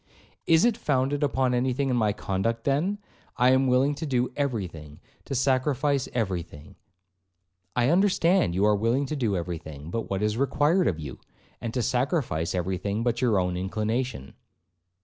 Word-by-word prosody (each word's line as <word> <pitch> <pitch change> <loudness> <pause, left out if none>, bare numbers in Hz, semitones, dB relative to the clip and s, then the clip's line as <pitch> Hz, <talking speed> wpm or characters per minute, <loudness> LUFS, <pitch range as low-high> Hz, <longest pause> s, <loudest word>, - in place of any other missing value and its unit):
'Is 165 +5 +5
it 235 -2 +2
founded 140 - 0
upon 135 -3 +1
any 125 +1 +1
thing 135 +1 -1
in - - +1
my 110 -3 +2
conduct, 105 +3 -2
then?—I 150 -4 -1
am 130 +1 +3
willing 130 +3 +3
to 150 +3 -5
do 125 -2 0
every 130 -9 -1
thing,—to 80 - -10
sacrifice 135 +1 +1
every 95 -8 -1
thing.'—'I 90 +6 -8
understand,—you 170 - +3
are 105 0 +4
willing 115 +7 +1
to 150 - -4
do 115 -9 0
every 85 -1 -4
thing 80 -1 -10
but 115 +3 -3
what 95 +1 -1
is 105 +1 0
required 145 +7 +2
of 80 - 0
you,—and 75 - -9
to 125 - 0
sacrifice 125 - 0
every 90 +1 -1
thing 100 +4 -2
but 120 0 0
your 115 -5 +3
own 90 -1 0
inclination.' 110 - -3
120 Hz, 160 wpm, -26 LUFS, 95-135 Hz, -, Is